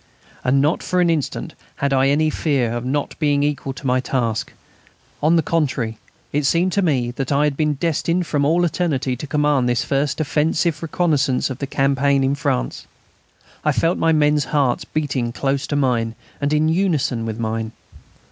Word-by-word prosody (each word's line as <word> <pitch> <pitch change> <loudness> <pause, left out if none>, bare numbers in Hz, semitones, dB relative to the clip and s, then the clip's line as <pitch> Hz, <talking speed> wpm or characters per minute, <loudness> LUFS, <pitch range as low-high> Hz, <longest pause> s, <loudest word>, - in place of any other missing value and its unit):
And 135 +2 +3
not 150 +4 +1
for 180 - -1
an 175 -1 +4
instant 155 -4 -2 0.2
had 140 -1 0
I 135 0 +3
any 155 +2 +2
fear 135 -9 0
of 120 0 -3
not 140 +3 -2
being 145 -2 +2
equal 145 -2 -1
to 135 - -11
my 130 0 +2
task. 120 -3 -1 0.7
On 155 +3 +4
the 165 - +3
contrary, 130 -9 -1 0.3
it 145 +1 +1
seemed 175 +5 +2
to 200 - +1
me 130 -9 +1
that 135 +2 -4
I 140 +1 +3
had 150 -2 +1
been 150 0 0
destined 170 +3 0
from 145 -2 0
all 170 +5 +3
eternity 150 -7 -1
to 140 +5 -7
command 145 -4 +2
this 120 - 0
first 140 +1 0
offensive 155 +1 0
reconnaissance 150 -6 +1
of 130 - -6
the 140 - -3
campaign 140 0 +2
in 135 +1 +2
France.... 60 - -2 0.8
I - - +3
felt 165 +2 +1
my 165 - +3
men's 150 -1 +3
hearts 140 -5 0
beating 135 -6 -2
close 135 +2 -1
to 145 - -2
mine 120 -5 +1 0.3
and 145 0 0
in 150 +1 +2
unison 160 -9 +1
with 110 -1 -4
mine. 110 -1 -2
140 Hz, 185 wpm, -20 LUFS, 130-155 Hz, 0.8 s, an